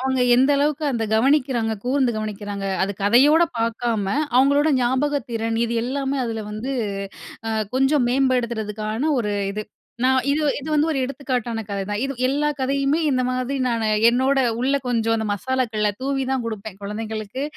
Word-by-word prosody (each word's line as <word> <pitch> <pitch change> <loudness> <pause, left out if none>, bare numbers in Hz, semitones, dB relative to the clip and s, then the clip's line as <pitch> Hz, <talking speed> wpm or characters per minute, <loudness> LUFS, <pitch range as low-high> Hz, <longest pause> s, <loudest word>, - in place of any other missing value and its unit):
அவங்க 260 0 0
எந்த 260 +3 +4
அளவுக்கு 295 +1 0
அந்த 230 -2 -1
கவனிக்கிறாங்க, 250 -2 +2
கூர்ந்து 255 -2 +1
கவனிக்கிறாங்க! 205 -2 -5 0.2
அது 195 +1 0
கதையோட 275 +10 +5 0.2
பாக்காம, 230 -2 -1 0.3
அவங்களோட 280 +4 +4
ஞாபகத்திறன், 245 -3 -1
இது 235 - -3
எல்லாமே 270 +2 -2
அதுல 225 -2 -3
வந்து 215 +5 -4 0.8
அ - - -1 0.3
கொஞ்சம் 270 0 +3
மேம்படுத்துறதுக்கான 235 -1 0
ஒரு 210 -3 -1 0.2
இது. 215 +1 -4 0.4
நான் 260 -1 +3
இது 295 +2 +1 0.2
இது 290 - -7
வந்து 300 +2 +2
ஒரு 275 - -1
எடுத்துக்காட்டான 250 -4 -3
கதைதான். 200 +1 -3
இது 275 - -2 0.2
எல்லா 290 +2 +1
கதையுமே, 275 +3 +1
இந்த 255 -1 +1
மாதிரி 255 +2 -2
நானு 230 -2 0 0.2
என்னோட 260 +3 +2 0.2
உள்ள 275 +2 +2
கொஞ்சம் 225 -2 +1
அந்த 220 -1 -2
மசாலாக்களை 220 -1 -1
தூவிதான் 265 -2 -1
குடுப்பேன், 215 -3 -6
குழந்தைங்களுக்கு. 215 +3 -5
250 Hz, 145 wpm, -22 LUFS, 220-275 Hz, 0.8 s, கதையோட